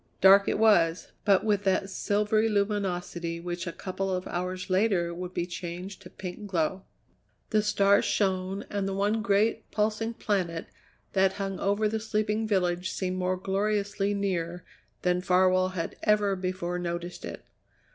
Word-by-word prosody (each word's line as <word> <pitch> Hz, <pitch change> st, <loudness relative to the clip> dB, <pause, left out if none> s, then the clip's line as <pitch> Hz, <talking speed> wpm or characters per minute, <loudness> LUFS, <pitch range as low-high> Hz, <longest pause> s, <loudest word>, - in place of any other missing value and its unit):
Dark 195 Hz, +1 st, +7 dB
it -, -, 0 dB
was, 180 Hz, -6 st, +3 dB
but 200 Hz, -3 st, +4 dB
with 205 Hz, -2 st, +1 dB
that 190 Hz, 0 st, +2 dB
silvery 210 Hz, +3 st, +1 dB
luminosity 185 Hz, -5 st, -1 dB
which 175 Hz, +1 st, -4 dB
a -, -, -2 dB
couple 195 Hz, +2 st, -4 dB
of 185 Hz, 0 st, -2 dB
hours 180 Hz, +1 st, -3 dB
later 185 Hz, -3 st, +2 dB
would 180 Hz, +1 st, -6 dB
be 175 Hz, -, -2 dB
changed 180 Hz, +2 st, -6 dB
to -, -, -11 dB
pink 190 Hz, +3 st, -7 dB
glow. 185 Hz, +1 st, -1 dB, 0.7 s
The 215 Hz, -1 st, +4 dB
stars 200 Hz, -1 st, +3 dB
shone, 190 Hz, 0 st, 0 dB
and 200 Hz, -1 st, -1 dB
the 195 Hz, -, -2 dB
one 205 Hz, +3 st, +1 dB
great, 210 Hz, +2 st, +1 dB
pulsing 220 Hz, +2 st, -1 dB
planet 180 Hz, -7 st, -1 dB, 0.5 s
that 190 Hz, -1 st, +3 dB
hung 195 Hz, -1 st, -4 dB
over 205 Hz, +2 st, +1 dB
the 220 Hz, +1 st, -1 dB
sleeping 215 Hz, 0 st, -1 dB
village 180 Hz, -3 st, +1 dB
seemed 185 Hz, -1 st, -2 dB
more 185 Hz, 0 st, 0 dB
gloriously 200 Hz, +1 st, 0 dB
near 180 Hz, -3 st, -2 dB, 0.4 s
than 180 Hz, 0 st, +2 dB
Farwell 185 Hz, 0 st, +3 dB
had 165 Hz, -, -3 dB
ever 210 Hz, -2 st, +3 dB
before 185 Hz, -1 st, -3 dB
noticed 175 Hz, 0 st, -4 dB
it. -, -, -7 dB
190 Hz, 155 wpm, -28 LUFS, 180-205 Hz, 0.7 s, Dark